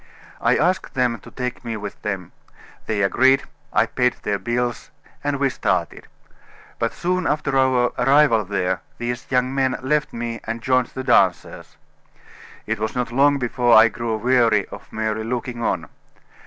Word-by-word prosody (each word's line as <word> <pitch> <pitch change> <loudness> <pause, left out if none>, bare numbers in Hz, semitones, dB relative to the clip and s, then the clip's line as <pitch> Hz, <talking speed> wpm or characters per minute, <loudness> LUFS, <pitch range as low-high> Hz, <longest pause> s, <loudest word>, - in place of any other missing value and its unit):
I - - +3
asked 185 -5 0
them 125 -3 +1
to - - -13
take 125 +1 -5
me 115 -2 -4
with 100 -1 -8
them; 95 -5 -4 0.6
they 105 -2 0
agreed, 130 +7 +4 0.3
I - - +3
paid 125 -1 0
their 100 -1 -1
bills, 120 +3 -2 0.3
and 145 0 0
we 140 -2 +2
started. - - -2 0.7
But - - 0
soon 180 0 -1
after 150 -2 -1
our 130 -2 +3
arrival 135 -3 +4
there 95 -2 -1 0.2
these 120 +1 -4
young 130 0 +1
men 135 -1 +1
left 150 +3 0
me 115 0 -4
and 115 +1 -3
joined 130 0 +1
the 130 - -7
dancers. - - +1 0.9
It 110 0 -2
was 110 +1 -3
not 125 -1 -2
long 140 +3 +4
before 120 -2 +3
I 110 +1 +7
grew 115 0 -3
weary 115 -3 +3
of - - -11
merely 110 0 -2
looking 120 +1 -4
on. - - -1
120 Hz, 160 wpm, -22 LUFS, 110-130 Hz, 0.9 s, I